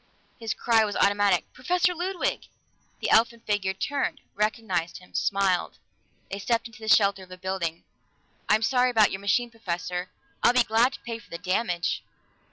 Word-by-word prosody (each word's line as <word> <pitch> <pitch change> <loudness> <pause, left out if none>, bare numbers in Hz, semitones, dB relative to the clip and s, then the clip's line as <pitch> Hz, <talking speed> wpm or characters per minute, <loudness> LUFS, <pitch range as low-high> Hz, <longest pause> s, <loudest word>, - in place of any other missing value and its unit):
His 225 -2 -3
cry 225 -2 +3
was 205 -1 -2
automatic. 200 -2 +3
"Professor 360 +7 +1
Ludwig!" 355 +2 -2 0.5
The - - 0
elfin 230 +1 +4
figure 205 -3 -1
turned, 280 +7 -2
recognized 205 -5 -1
him, 180 - -17
smiled. 195 -3 +1 0.5
They 200 - -4
stepped 230 +3 0
into 230 0 -11
the 220 - -8
shelter 200 -2 +4
of 185 - -13
a 185 - -10
building. 180 -3 -3 0.7
"I'm 215 +1 +4
sorry 250 +2 +3
about 220 -4 +4
your 190 - -4
machine, 235 +4 +1
Professor. 180 -4 -4 0.3
I'd 240 - +4
be 250 - +6
glad 230 +4 +3
to - - -8
pay 230 -1 -5
for - - -19
the 170 - -5
damage." 180 -2 -1
210 Hz, 170 wpm, -26 LUFS, 190-235 Hz, 0.7 s, be